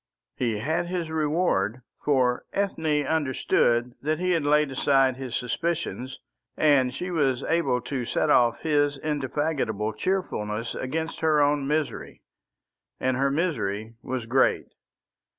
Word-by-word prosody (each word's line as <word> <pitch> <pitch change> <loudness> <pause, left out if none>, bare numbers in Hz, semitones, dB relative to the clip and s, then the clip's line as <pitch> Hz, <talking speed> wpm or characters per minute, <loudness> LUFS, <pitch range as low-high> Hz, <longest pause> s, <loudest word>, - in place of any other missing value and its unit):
He 115 -4 -1
had 160 +10 -1
his 175 -3 -3
reward, 150 - 0 0.2
for 130 -4 +2
Ethne 160 -7 0
understood 125 -5 +1
that 155 +2 0
he 180 +2 0
had 165 -4 +1
laid 150 0 +3
aside 135 -1 +3
his 130 -2 -5
suspicions, 130 0 -3 0.4
and 140 -4 +4
she 180 +8 -5
was 140 -6 +1
able 165 -7 +1
to 125 +1 -3
set 150 +5 +1
off 120 -3 +4
his 145 -2 +1
indefatigable 135 -7 -1
cheerfulness 115 - -2
against 160 +5 -3
her 155 -2 +3
own 145 -1 +2
misery. 150 0 -2 0.8
And 130 0 +1
her 135 +2 +2
misery 115 - -1
was 125 -2 -4
great. 130 +3 +2
140 Hz, 130 wpm, -26 LUFS, 125-160 Hz, 0.8 s, and